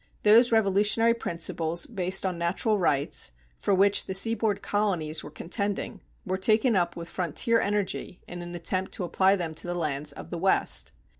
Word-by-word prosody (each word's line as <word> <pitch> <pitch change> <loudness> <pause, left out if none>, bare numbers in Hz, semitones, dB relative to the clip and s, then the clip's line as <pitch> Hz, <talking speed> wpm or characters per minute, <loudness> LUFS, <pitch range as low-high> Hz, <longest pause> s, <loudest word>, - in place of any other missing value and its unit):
Those 230 +4 +6
revolutionary 220 +2 +3
principles 170 -5 -2
based 190 -3 -1
on 185 -2 -1
natural 195 +5 0
rights, 140 - 0 0.3
for - - -1
which 200 +1 +3
the 190 - -3
seaboard 220 0 +1
colonies 170 -7 0
were - - -8
contending, 200 +6 -3 0.2
were 185 0 -2
taken 220 +4 +3
up 175 -2 0
with 170 0 -7
frontier 185 - 0
energy 200 -3 -2
in 175 0 -7
an 175 0 -7
attempt 185 +2 -2
to - - -3
apply 190 +3 +3
them 170 -4 -4
to 160 - -3
the 175 - -2
lands 150 -3 -2
of - - -11
the 170 - -4
West. 190 +2 +1
190 Hz, 170 wpm, -27 LUFS, 170-205 Hz, 0.3 s, Those